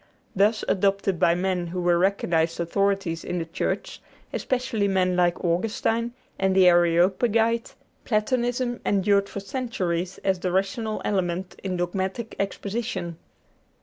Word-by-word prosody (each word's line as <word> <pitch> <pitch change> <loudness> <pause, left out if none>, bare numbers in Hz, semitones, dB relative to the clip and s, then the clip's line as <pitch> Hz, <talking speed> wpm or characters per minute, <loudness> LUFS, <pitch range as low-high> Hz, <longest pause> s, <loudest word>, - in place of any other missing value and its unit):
Thus 210 +3 +3
adopted 195 -2 +1
by 170 - +4
men 180 -1 -1
who 180 +2 -4
were 175 -1 +3
recognized 170 -4 +1
authorities 195 -1 0
in 180 - -3
the 165 - -2
Church, - - -3 0.3
especially 240 -5 0
men 185 -2 +2
like 175 0 +1
Augustine 225 +6 0 0.3
and 190 -1 +2
the 190 -1 +6
Areopagite, 190 +7 +3 0.3
Platonism 245 +2 0
endured 200 0 +2
for - - -5
centuries 190 -6 -2
as 190 -2 +1
the 180 0 -1
rational 215 +4 -1
element 185 -2 -1
in 185 -2 -2
dogmatic 190 +5 -3
exposition. 195 -3 -3
190 Hz, 125 wpm, -25 LUFS, 175-215 Hz, 0.3 s, the